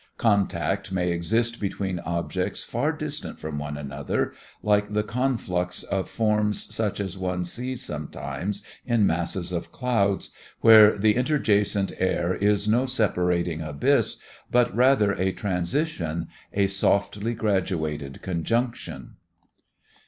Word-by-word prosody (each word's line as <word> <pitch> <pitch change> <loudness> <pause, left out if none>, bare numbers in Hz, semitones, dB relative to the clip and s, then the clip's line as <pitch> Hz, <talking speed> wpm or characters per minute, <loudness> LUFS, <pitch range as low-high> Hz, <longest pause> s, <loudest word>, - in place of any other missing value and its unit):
Contact 100 -3 +1
may 90 -2 0
exist 115 +8 0
between 95 -2 -2
objects 85 0 -2
far 140 +7 0
distant 155 -2 -6
from 80 -1 -4
one 75 0 -4
another, 70 0 -2 0.3
like 105 0 +2
the 105 0 +2
conflux 105 -7 -1
of 95 -1 -2
forms 105 -2 0
such 105 -3 -1
as 95 -2 -4
one 90 -1 -1
sees 125 +7 -3
sometimes 80 +6 -4 0.2
in 115 -4 +2
masses 85 +1 -1
of 85 -2 -4
clouds, 105 -7 0 0.3
where 110 -2 +8
the 105 +1 +3
interjacent 105 -7 +2
air 90 -1 +1
is 105 +1 +1
no 120 +5 +3
separating 90 -8 0
abyss, 75 -2 +1 0.3
but 120 -3 +2
rather 125 -4 +4
a 95 -1 0
transition, 90 - -2 0.2
a 100 0 +2
softly 100 +3 +1
graduated 80 -10 -1
conjunction. 95 - -2
100 Hz, 120 wpm, -25 LUFS, 85-115 Hz, 0.3 s, where